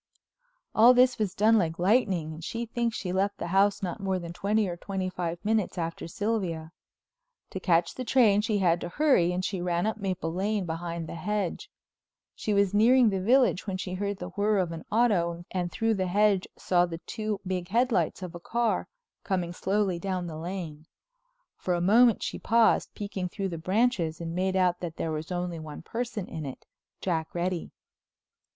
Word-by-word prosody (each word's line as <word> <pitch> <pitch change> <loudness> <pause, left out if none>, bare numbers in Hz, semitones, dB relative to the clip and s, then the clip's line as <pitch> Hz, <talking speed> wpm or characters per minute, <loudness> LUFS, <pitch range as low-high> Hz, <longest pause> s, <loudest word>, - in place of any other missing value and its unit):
All 240 +3 +7
this 250 0 +4
was 200 -3 -1
done 220 +2 +5
like 165 -3 -1
lightning 185 -5 +2
and 160 +1 -10
she 230 +7 -3
thinks 235 0 -2
she 180 -2 -3
left 200 +2 0
the - - -4
house 200 +2 +3
not 180 +3 -3
more 190 -1 -1
than 170 -1 -6
twenty 205 +3 +1
or 175 - -3
twenty 185 +1 -4
five 175 -2 -3
minutes 215 -3 0
after 165 -1 -3
Sylvia. 175 -5 -2 0.8
To 190 - -4
catch 170 -2 +2
the 255 - -5
train 225 -5 +4
she 215 -1 0
had 175 -3 +2
to 175 - -4
hurry 225 - +3
and 180 +1 -2
she 190 -3 -2
ran 175 0 0
up 220 0 -1
Maple 185 -5 -3
Lane 200 +2 -1
behind 170 0 -4
the - - -6
hedge. 210 - -3 0.6
She 215 - -3
was 200 -1 +2
nearing 235 +2 +5
the 190 -1 -1
village 240 -2 +3
when 190 -1 -2
she 185 -1 -5
heard 200 +1 -2
the - - -6
whirr 205 +1 +1
of 180 -3 0
an 165 -1 -7
auto 175 -7 +2
and 175 -2 -2
through 225 0 +1
the 190 -3 -1
hedge 200 0 +2
saw 175 -1 +2
the 165 -1 -5
two 215 -2 -3
big 180 -1 -2
headlights 220 -5 +1
of 180 - -6
a 175 - -7
car, 235 +5 0 0.4
coming 180 -3 -1
slowly 190 -1 0
down 185 -1 -2
the 165 -2 -6
Lane. 160 -2 -6 0.7
For 180 - -1
a - - -1
moment 225 +6 +5
she - - -4
paused, 230 0 +3
peeking 195 -3 -4
through 195 +1 -3
the 165 -2 -5
branches 185 -3 +1
and 165 -1 -4
made 185 +2 0
out 180 -2 +2
that 170 -2 -5
there 160 - -2
was 155 +2 -4
only 175 -2 -3
one 155 0 -8
person 235 -1 -4
in 160 - -6
it, 130 - -9 0.4
Jack 165 -3 -2
Reddy. 175 0 -2
185 Hz, 195 wpm, -28 LUFS, 175-210 Hz, 0.8 s, All